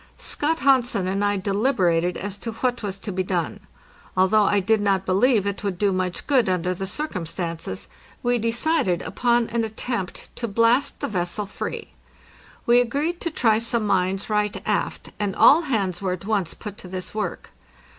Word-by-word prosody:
Scott 320 +3 -1
Hansen 250 -8 +3
and 195 +2 -1
I 205 0 +2
deliberated 190 -4 +1
as 200 +1 -4
to 230 - -5
what 245 +2 -1
was 200 -3 -4
to 200 +1 -6
be 185 0 -1
done. 180 -4 -2 0.6
Although 200 +3 +4
I 205 0 +3
did 210 +3 +2
not 195 -2 +1
believe 205 +3 +3
it 200 0 -3
would 195 -3 -2
do 200 +1 +2
much 185 -1 -2
good 260 -8 +3
under 180 0 0
the 190 +2 -5
circumstances, 165 - -4 0.4
we 245 0 +2
decided 230 - +1
upon 240 -1 +1
an 230 0 0
attempt 220 -3 -4
to 235 - -2
blast 230 +5 +2
the - - -1
vessel 185 +1 -2
free. 195 - -6 0.7
We 240 +1 +6
agreed 290 +8 -1
to 335 - -1
try 225 -8 +2
some 230 -1 +1
mines 190 0 +1
right 210 -1 0
aft, - - -2
and 205 -2 -1
all 310 +4 +7
hands 200 - -1
were 185 -2 0
at 180 +1 -7
once 205 -5 -1
put 210 -2 -8
to - - -10
this 185 0 -5
work. 215 -1 -4
205 Hz, 175 wpm, -23 LUFS, 185-235 Hz, 0.7 s, all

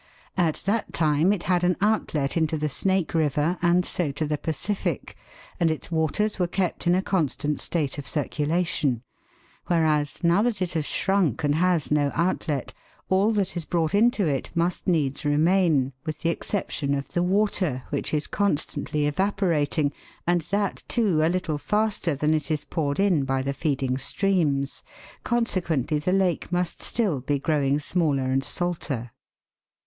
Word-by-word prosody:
At 170 -4 0
that 210 +2 -1
time 155 +3 +3
it 205 -4 -1
had 180 -1 +1
an 180 -1 +2
outlet 195 -9 0
into 160 -1 +1
the 150 0 -1
Snake 190 +4 0
River 155 +2 +1
and 175 +1 +3
so 165 -6 -1
to 155 +2 -2
the 150 -1 -2
Pacific, 160 +7 -2 0.4
and 170 -2 +3
its 155 +2 -3
waters 165 +7 0
were 180 - +2
kept 180 -1 -2
in 175 - +5
a 190 - +1
constant 150 -5 0
state 150 -4 -1
of 140 - -6
circulation; 150 -4 0 0.6
whereas, 155 -4 +1
now 170 +4 +4
that 235 -2 0
it 180 -2 -1
has 155 -3 -1
shrunk 190 - +1
and 145 0 +2
has 170 -1 +1
no 145 -1 +2
outlet, 160 -5 -1 0.4
all 195 +4 +3
that 200 -4 0
is 170 - -2
brought 165 +1 -1
into 220 0 +3
it 140 -4 -1
must 170 +1 -1
needs 150 -6 +1
remain, 150 -2 +2
with 155 -2 -5
the 165 - +1
exception 150 -7 -2
of 140 0 -4
the 175 - 0
water, 185 -7 +1
which - - -2
is 150 -1 0
constantly 150 -5 -1
evaporating, 155 -3 +1 0.3
and 175 0 +2
that, 200 0 -1
too, 200 -10 +2
a 160 - +3
little 175 -4 -1
faster 210 -5 0
than 150 +3 +1
it 150 -2 -1
is 155 -2 -1
poured 145 -2 -2
in 190 -8 +3
by 135 0 0
the 140 +1 -1
feeding 135 -4 -1
streams. 145 -5 0 0.4
Consequently, 175 - 0
the 165 +5 -1
lake 185 -3 +1
must 180 -1 -1
still 200 - 0
be 145 +3 0
growing 140 -1 +1
smaller 150 -4 0
and 135 +1 +1
salter. 145 -8 -3
160 Hz, 165 wpm, -25 LUFS, 145-185 Hz, 0.6 s, in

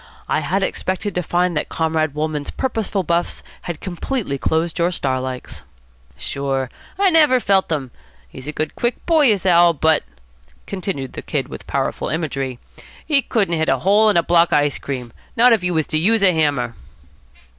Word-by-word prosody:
I - - +1
had 185 +6 -1
expected 190 +1 -2
to 180 - -1
find 175 0 0
that 150 - -2
Comrade 160 -2 -1
Wolmann's 150 -1 -2
purposeful 220 -6 -2
buffs 170 +1 -1 0.3
had 170 - -4
completely 185 - -3
closed 160 +4 -1
your 170 +1 +3
star 130 -7 -1
likes." 130 -1 -6 0.6
"Sure, 135 -2 -3 0.3
I 390 -1 +4
never 300 -6 +5
felt 195 -5 +2
them. 140 -6 -2 0.4
He's 130 - -11
a - - -2
good 155 0 -3
quick 240 0 -2
boy, 310 -7 +5
is 200 -3 -1
Al., 175 -1 +5
but," 160 0 +3 0.6
continued 185 -9 -4
the - - -6
Kid - - -3
with - - -9
powerful - - -2
imagery, 135 -6 -3 0.5
"he 285 -3 +3
couldn't 205 -9 0
hit 160 - +1
a 135 - +3
hole 205 - +4
in 205 - +3
a 170 - +4
block 170 0 +3
of - - +5
ice 145 -1 +1
cream, 125 -4 -5 0.2
not 240 +1 +6
if 220 - +2
he 180 - 0
was 160 -3 +1
to 155 - 0
use 215 +5 +3
a 185 -2 +5
hammer." 145 -7 0
170 Hz, 185 wpm, -20 LUFS, 145-200 Hz, 0.6 s, not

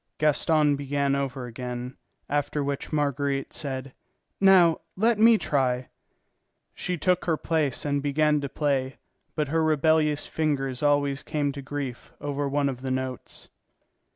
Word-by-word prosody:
Gaston 150 0 +3
began 140 0 0
over 135 -2 -3
again, 125 +1 -6 0.3
after 145 0 -1
which 140 -1 -3
Marguerite 140 -2 -1
said: 135 -2 -5 0.5
"Now, 185 -4 +6 0.2
let 220 +2 +2
me 225 +1 +7
try." 130 -7 0 0.8
She 180 -1 -3
took 180 +3 +1
her 165 -2 +1
place 150 -6 -1
and 145 -1 0
began 150 +1 +2
to 140 - -4
play; 135 -3 -1 0.4
but 150 -3 -1
her 160 +2 +1
rebellious 155 -1 +2
fingers 135 -5 -1
always 145 -1 +2
came 145 -2 -1
to 140 0 -7
grief 135 -3 -6
over 145 -1 -2
one 140 0 +1
of 130 -2 -4
the 130 - -4
notes. 130 -1 -4
145 Hz, 140 wpm, -26 LUFS, 135-155 Hz, 0.8 s, me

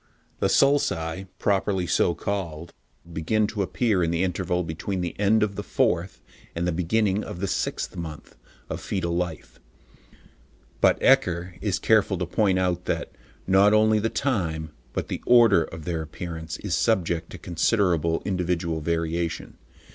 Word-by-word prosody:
The - - +2
sulci, 95 - +2
properly 95 -2 +1
so 85 0 +2
called, 85 -3 -4 0.4
begin 105 +7 +1
to 105 0 -3
appear 100 -1 +1
in 85 - +1
the 85 +2 0
interval 90 0 -1
between 85 +4 -3
the 85 -1 -3
end 105 +2 +3
of 100 -2 -1
the - - -3
fourth 90 +2 -1 0.3
and 85 +1 -1
the 90 - +1
beginning 95 +4 +1
of 90 - -7
the 100 - -1
sixth - - -2
month 80 -3 -8 0.3
of - - -5
foetal 85 -3 -2
life, 85 -7 -4 1.2
but - - +4
Ecker 85 0 +3
is 100 -2 0
careful 105 -3 +3
to 90 - -2
point 95 +1 +1
out 90 -1 0
that, - - -2 0.3
not 100 +3 +5
only 110 0 +4
the 110 +2 0
time, 80 - -1 0.2
but - - -3
the - - -4
order, 115 -9 +6
of 80 -2 -10
their 85 -2 -2
appearance 80 0 -6
is 105 -4 -4
subject 85 -6 +1
to - - -8
considerable 85 -2 +1
individual 85 -4 -1
variation. 85 +1 -2
90 Hz, 155 wpm, -25 LUFS, 85-100 Hz, 1.2 s, order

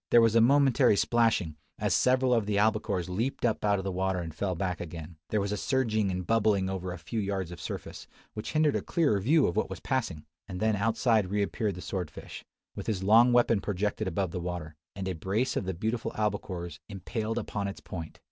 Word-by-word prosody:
There 120 - +7
was 115 -1 +4
a 115 - +5
momentary 135 -3 +5
plashing, 110 -11 +2 0.2
as - - 0
several 130 0 +3
of 115 -4 +1
the 105 - 0
albacores 105 -3 +1
leaped 115 +9 -2
up 110 -2 0
out 105 -1 +3
of 95 - -4
the 95 - -2
water 95 0 0
and 80 -2 -5
fell 95 +3 -2
back 90 -1 -2
again, 85 -1 -8
there 110 - +1
was 100 0 -1
a 105 - -1
surging 110 -4 +1
and 90 -1 -3
bubbling 105 -3 +2
over 95 -1 -4
a 90 - -5
few 85 +8 -4
yards 95 -4 -2
of 85 - -9
surface, - - -7 0.3
which 105 - -5
hindered 155 -2 +3
a - - 0
clearer 145 -12 +1
view 145 +9 +4
of 85 - -1
what - - 0
was - - -6
passing; 110 -12 -2 0.2
and 90 - -6
then 110 -1 +2
outside 110 -1 +2
reappeared 100 0 -1
the 90 - -8
sword 90 -5 -3
fish, - - -10 0.3
with - - -6
his 95 -4 -1
long 115 +5 +6
weapon 120 -3 +4
projected 105 +1 -2
above 95 -2 -1
the 90 - -3
water, 85 -3 -5 0.2
and 95 -1 -4
a 95 - -1
brace 100 +10 -1
of - - -1
the 95 - -2
beautiful 110 +6 -2
albacores 95 -5 -3
impaled 110 +3 -3
upon 105 -3 -3
its 100 - -6
point! 80 -3 -8
100 Hz, 220 wpm, -29 LUFS, 90-115 Hz, 0.3 s, There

